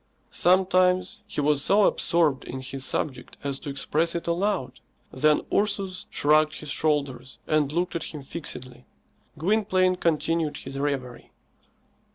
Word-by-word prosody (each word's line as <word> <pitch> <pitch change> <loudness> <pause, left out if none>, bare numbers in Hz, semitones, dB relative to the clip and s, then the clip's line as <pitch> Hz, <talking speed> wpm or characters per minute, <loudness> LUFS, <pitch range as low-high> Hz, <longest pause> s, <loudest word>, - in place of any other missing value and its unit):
Sometimes 185 0 +3
he - - -2
was 145 -1 +2
so 205 +1 +4
absorbed 160 -6 +2
in 130 - -6
his 135 0 -5
subject 135 0 -3
as 140 -1 -2
to 150 - -7
express 155 +4 0
it 170 - -3
aloud. 170 -7 -1 0.3
Then 150 +3 +3
Ursus 200 -3 -1
shrugged 155 +1 +3
his 150 -2 -6
shoulders 140 -5 -1
and 150 -2 +1
looked 175 +3 -1
at 165 - -2
him 150 -3 -7
fixedly. 130 -5 -7 0.5
Gwynplaine 185 +1 +2
continued 165 -2 0
his 135 - -7
reverie. 135 -4 -3
155 Hz, 135 wpm, -26 LUFS, 140-180 Hz, 0.5 s, so